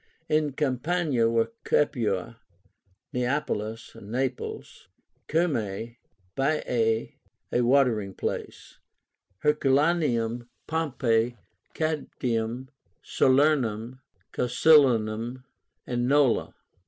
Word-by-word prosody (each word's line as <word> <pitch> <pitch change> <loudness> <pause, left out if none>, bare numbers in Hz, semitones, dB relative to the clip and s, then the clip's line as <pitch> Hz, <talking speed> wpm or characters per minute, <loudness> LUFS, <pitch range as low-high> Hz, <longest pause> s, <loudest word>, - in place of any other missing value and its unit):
In 155 -2 +1
Campania 140 -2 +1
were 115 - +1
Capua, 115 -6 0 0.7
Neapolis 120 -4 -2
(Naples), 125 +5 -4 0.4
Cumae, 120 - -1 0.4
Baiae, 125 -6 0 0.4
a 120 - +2
watering 120 -6 +2
place, - - -5 0.6
Herculaneum, 135 -5 +1 0.2
Pompeii, 125 -7 0 0.4
Caudium, 130 -6 -2 0.3
Salernum, 130 -4 +2 0.3
Casilínum, 125 -3 +3 0.4
and 120 0 -1
Nola. 140 -3 +2
125 Hz, 65 wpm, -26 LUFS, 115-145 Hz, 0.7 s, Casilínum